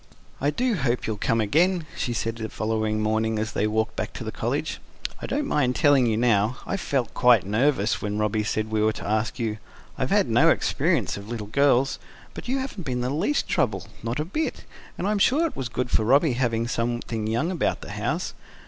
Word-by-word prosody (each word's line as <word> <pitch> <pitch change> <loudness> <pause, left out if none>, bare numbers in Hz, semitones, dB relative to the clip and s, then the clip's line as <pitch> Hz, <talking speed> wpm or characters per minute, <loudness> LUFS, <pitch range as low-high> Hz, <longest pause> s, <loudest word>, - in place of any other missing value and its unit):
"I 140 - +2
do 245 - 0
hope 125 -4 0
you'll 110 -1 -2
come 115 +3 +1
again," 165 - +2
she 125 - -2
said 115 0 -2
the 110 -1 -4
following 110 -1 -1
morning, 110 +1 +1
as 110 +1 -2
they 105 - 0
walked 110 +1 0
back - - -3
to - - -6
the - - -4
College. - - -2 0.4
"I - - -4
don't 285 +2 -1
mind 130 - +1
telling 140 -4 +4
you 110 -1 +1
now, 115 0 +2
I - - -2
felt 135 -10 -1
quite 120 -6 +5
nervous 110 +1 +1
when 105 0 -2
Robby 105 0 +1
said 110 +1 -2
we 110 -1 +1
were 110 0 +3
to - - -7
ask 110 +1 0
you. 110 -3 -2 0.4
I've - - 0
had - - +3
no - - +5
experience - - +1
of 100 +2 -9
little 115 -3 -4
girls. 135 +3 +2 0.3
But - - -8
you 260 +2 0
haven't 265 -7 -4
been 125 -6 -2
the 125 +1 -1
least 190 - 0
trouble 95 -5 0 0.2
not 115 +4 -3
a 150 - -1
bit. 305 - -3 0.3
And 180 - -3
I'm 210 0 +1
sure 285 +11 +4
it 325 - -3
was 130 -3 -3
good 125 0 -3
for 110 - +3
Robby 140 +5 +4
having 115 -2 0
something 115 -2 -2
young 120 +11 0
about 180 - -1
the - - -8
house. - - -2
120 Hz, 215 wpm, -25 LUFS, 110-145 Hz, 0.4 s, quite